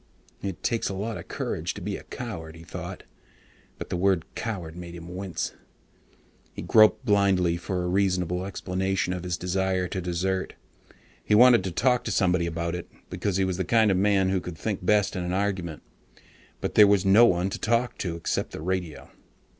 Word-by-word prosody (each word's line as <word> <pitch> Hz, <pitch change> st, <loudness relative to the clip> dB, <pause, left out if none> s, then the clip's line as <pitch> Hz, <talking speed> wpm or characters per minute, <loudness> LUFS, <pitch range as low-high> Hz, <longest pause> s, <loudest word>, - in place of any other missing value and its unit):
It 95 Hz, -3 st, -5 dB
takes 115 Hz, -2 st, 0 dB
a 100 Hz, -, -4 dB
lot 110 Hz, +4 st, -3 dB
of -, -, -10 dB
courage -, -, -3 dB
to -, -, -6 dB
be -, -, -3 dB
a -, -, -7 dB
coward, 85 Hz, -10 st, -7 dB
he 80 Hz, -, -12 dB
thought, -, -, -7 dB, 0.7 s
but -, -, -8 dB
the -, -, 0 dB
word 95 Hz, -2 st, +2 dB
coward 90 Hz, -8 st, -5 dB
made 85 Hz, -1 st, -8 dB
him 85 Hz, +1 st, -9 dB
wince. 95 Hz, -1 st, -4 dB, 1.0 s
He -, -, -6 dB
groped 110 Hz, +3 st, +5 dB
blindly 100 Hz, -5 st, +3 dB
for 90 Hz, +1 st, -3 dB
a -, -, -1 dB
reasonable 90 Hz, -1 st, 0 dB
explanation 95 Hz, -1 st, -1 dB
of 90 Hz, -, -4 dB
his 90 Hz, -1 st, -2 dB
desire 95 Hz, 0 st, 0 dB
to 95 Hz, -, -3 dB
desert. 90 Hz, +2 st, -2 dB, 0.7 s
He 105 Hz, -, +2 dB
wanted 120 Hz, -2 st, +7 dB
to 95 Hz, -, -2 dB
talk 125 Hz, +7 st, +2 dB
to 115 Hz, -, -2 dB
somebody 90 Hz, -3 st, +2 dB
about 85 Hz, 0 st, -3 dB
it, 90 Hz, 0 st, -6 dB, 0.2 s
because 100 Hz, -3 st, -1 dB
he 95 Hz, -, +2 dB
was 95 Hz, -2 st, -2 dB
the 95 Hz, -, 0 dB
kind 110 Hz, +3 st, +3 dB
of 95 Hz, -, +2 dB
man 95 Hz, -1 st, +3 dB
who 95 Hz, -1 st, 0 dB
could 85 Hz, -2 st, -7 dB
think 105 Hz, -1 st, -3 dB
best 105 Hz, +2 st, +2 dB
in 90 Hz, -, -2 dB
an 90 Hz, 0 st, -2 dB
argument. 95 Hz, -5 st, -2 dB, 0.8 s
But -, -, -2 dB
there 105 Hz, -, +8 dB
was 100 Hz, -1 st, +3 dB
no 105 Hz, +5 st, +7 dB
one 90 Hz, 0 st, +1 dB
to -, -, -4 dB
talk 115 Hz, +2 st, 0 dB
to 85 Hz, -3 st, -2 dB
except 85 Hz, -, -2 dB
the -, -, -6 dB
radio. 90 Hz, -3 st, -3 dB
95 Hz, 195 wpm, -26 LUFS, 90-100 Hz, 1.0 s, there